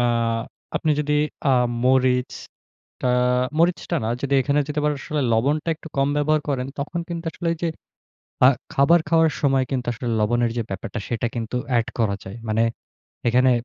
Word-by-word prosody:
আ - - +3 0.7
আপনি 155 - 0
যদি 150 0 0 0.4
আ - - +4 0.3
মরিচটা 130 0 -1 0.5
মরিচটা 170 +1 +1
না - - -1
যদি 140 0 0
এখানে 145 +2 +2
যদি 150 0 -3
আবার 150 0 +2
আসলে 150 +1 -2
লবণটা 145 +8 +1
একটু 160 - -11
কম 135 0 +2
ব্যবহার 155 +1 +2
করেন, 130 -3 -1
তখন 160 +5 -3
কিন্তু 170 -1 -5
আসলে 175 - -3
ওইযে 170 +1 -2 0.8
আ - - +10 0.3
খাবার 165 +5 +5
খাওয়ার 165 -1 +4
সময় 135 -2 +3
কিন্তু 125 -2 -2
আসলে 120 +1 -4
লবণের 120 +2 +2
যে - - +1
ব্যাপারটা, 95 +2 -5
সেটা 120 0 -1
কিন্তু 115 0 -3 0.2
এড 115 - 0
করা 105 -3 +2
যায়। 95 +4 -8
মানে 110 +1 +2 0.7
এখানে 125 +2 +4
135 Hz, 165 wpm, -23 LUFS, 120-155 Hz, 0.8 s, আ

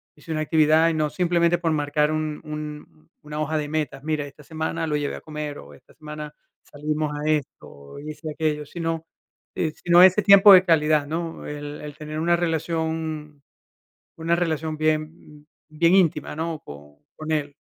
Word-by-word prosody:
Hice 150 +2 -11
una 155 -1 -1
actividad, 155 +1 +4
y - - -1
no, 155 -1 0
simplemente 175 -1 +2
por 165 -2 0
marcar 150 0 +1
un 155 -1 -3
un 150 - -8
una 150 0 -7
hoja 155 +1 -1
de 145 -1 -4
metas, 150 -3 -3
mira, 155 -1 -1
esta 145 +1 -14
semana 160 +2 -3
lo 150 - -1
llevé 145 -1 -3
a - - -11
comer, 150 -2 -6
o 70 +1 -13
esta - - -22
semana 150 -1 -8 0.3
salimos 150 +1 -3
a 150 +1 -4
esto, 150 -3 -2
o 70 - -13
hice 150 +1 -7
aquello, 150 -1 -2
sino, 165 0 -4 0.5
eh, 160 - -1
sino 175 +1 +7
ese 185 +3 +6
tiempo 200 0 +8
de 185 - +8
calidad, 155 -4 +2
¿no? 165 +2 -4
El 145 0 -7
el 150 0 -9
tener 155 0 -6
una 170 +2 +3
relación 160 -2 -3 0.7
una 165 +1 0
relación 160 -2 -2
bien, 155 0 +2 0.4
mm, - - -27 0.3
bien 170 +3 +4
íntima, 160 -6 +2
¿no? 160 -1 -3
Con 75 0 -12 0.2
con 155 0 -5
él. 145 -2 -1
155 Hz, 180 wpm, -24 LUFS, 150-165 Hz, 0.7 s, tiempo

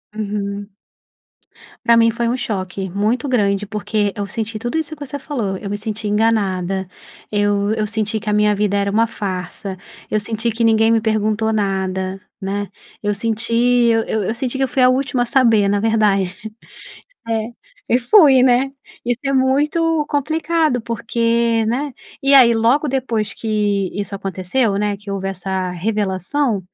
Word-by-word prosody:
Uhum. 205 -1 -4 1.2
Pra 235 - +6
mim 230 0 +5
foi 235 +1 -1
um 240 - +1
choque 190 -5 -4
muito 215 +9 0
grande, 205 -5 +1
porque 210 -1 -1
eu 205 -1 -3
senti 220 0 -4
tudo 240 +8 -2
isso 315 0 -3
que 290 -1 -8
você 285 +1 -5
falou. 235 -9 -3
Eu 200 +1 -7
me 205 - -2
senti 215 0 -4
enganada, 195 -4 0 0.4
eu 205 0 +1
eu 215 -1 0
senti 220 0 -1
que 215 - -5
a - - +1
minha 210 0 +3
vida 205 0 0
era 200 0 0
uma 225 +3 +3
farsa, 190 -2 -5 0.3
eu 215 - +2
senti 225 +2 -2
que 230 +2 -2
ninguém 225 0 +4
me 230 - +4
perguntou 220 0 0
nada, 190 -2 -1 0.2
né. 200 +1 -3 0.3
Eu 205 -1 0
senti 225 +2 -2
eu 235 -1 +3
eu 220 0 -2
senti 260 +1 -3
que 270 - +1
eu - - +2
fui 260 +1 0
a 250 - +6
última 260 -1 +1
a - - -3
saber, 230 -6 +3
na 205 0 +1
verdade. 205 -4 +1 0.9
É, 225 -1 0 0.5
e 245 - +4
fui, 270 - +6
né? 255 +1 +3 0.3
Isso 245 0 -1
é 275 - +1
muito 295 +4 +2
complicado 315 -1 0
porque 230 0 0
né? 265 +6 -1 0.3
E 275 +1 +3
aí, 250 -4 +8
logo 235 +7 +2
depois 240 -5 -1
que 205 -3 -1
isso 200 0 -4
aconteceu, 195 +4 -1
né, 205 0 0
que 200 +1 -12
houve 195 -1 -3
essa 190 -1 -3
revelação, 205 - -1
220 Hz, 165 wpm, -19 LUFS, 200-245 Hz, 1.2 s, aí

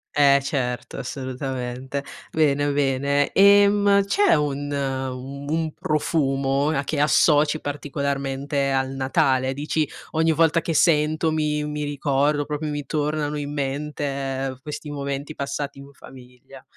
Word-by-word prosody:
eh 140 -1 +6
certo 130 -3 -3
assolutamente, 130 0 -4 0.3
bene, 145 -2 +2
bene. 140 0 +1
E, 200 +1 +7
mhmm, 200 -1 +3
c'è 405 - +3
un 145 -1 -2
u 135 0 -4
un 160 -1 -1
profumo 140 -2 0
a 145 -3 0
che 145 +1 -2
associ 150 0 +4
particolarmente 140 -1 -2
al 135 0 0
Natale. 135 -1 +1
Dici: 150 +1 -1 0.2
"Ogni 160 0 +2
volta 165 +1 +3
che 165 - -2
sento 155 0 +3
mi 150 -1 0
mi 150 0 -3
ricordo, 145 0 0
proprio 150 +1 -3
mi 145 -1 -4
tornano 150 -1 -1
in 145 0 -4
mente, 135 -2 -3
questi 150 0 -7
momenti 140 +1 -4
passati 140 0 -4
in 140 0 -12
famiglia". 130 +1 -15
145 Hz, 130 wpm, -23 LUFS, 135-150 Hz, 0.3 s, E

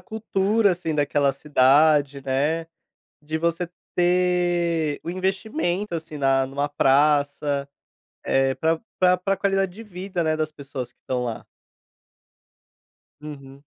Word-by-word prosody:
cultura, 215 -1 +1
assim, 170 -3 -2
daquela 145 -1 +2
cidade, 145 0 +3
né, 150 +5 0 0.6
de 155 +2 -3
você 170 +1 -1 0.3
ter 175 -3 +1
o 170 - -5
investimento, 190 - -2
assim, 160 -2 -7
na 135 -1 +2
numa 140 +2 -2
praça, 145 0 +2 0.6
eh, 135 0 +2
para 160 0 0 0.2
para 180 0 +4
para 195 +2 -1
qualidade 195 -1 0
de 225 +4 -10
vida, 185 -2 -4
né, 155 -1 +1
das 155 0 -2
pessoas 140 -4 -7
que - - -43
estão 125 -1 -3
lá. 115 -2 -5 1.8
Uhum. 140 -2 -10
155 Hz, 120 wpm, -23 LUFS, 140-180 Hz, 1.8 s, para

